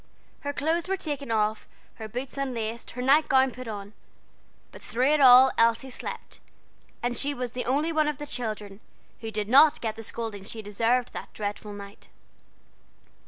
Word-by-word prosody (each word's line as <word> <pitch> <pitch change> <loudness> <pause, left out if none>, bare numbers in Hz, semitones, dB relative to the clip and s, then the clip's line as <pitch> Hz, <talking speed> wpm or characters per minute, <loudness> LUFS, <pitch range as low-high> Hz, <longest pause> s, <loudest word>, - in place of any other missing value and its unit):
Her 285 - -3
clothes 320 +4 -1
were 385 0 0
taken 290 -7 -4
off, 215 -1 0 0.3
her 220 - -6
boots 250 +5 -6
unlaced, 235 -4 -4
her 250 - -2
night 285 +4 +4
gown 265 0 +4
put 255 -1 -9
on; 205 -1 -7 0.8
but - - -13
through 255 +4 +1
it 305 - +2
all 260 0 +9
Elsie 230 +3 +3
slept, - - -7 0.6
and 245 0 -1
she 285 +4 +1
was 250 -2 -4
the 250 0 -3
only 290 +6 +1
one 310 -1 +2
of 300 -2 -2
the 295 - -6
children 215 -7 -5 0.4
who 225 - -6
did 210 -1 -2
not 290 +6 +6
get 220 -2 -3
the 225 - -8
scolding 225 -2 -5
she 220 +2 -6
deserved 230 +4 0
that - - -7
dreadful 210 0 -5
night. 200 0 -11
245 Hz, 175 wpm, -26 LUFS, 220-275 Hz, 0.8 s, all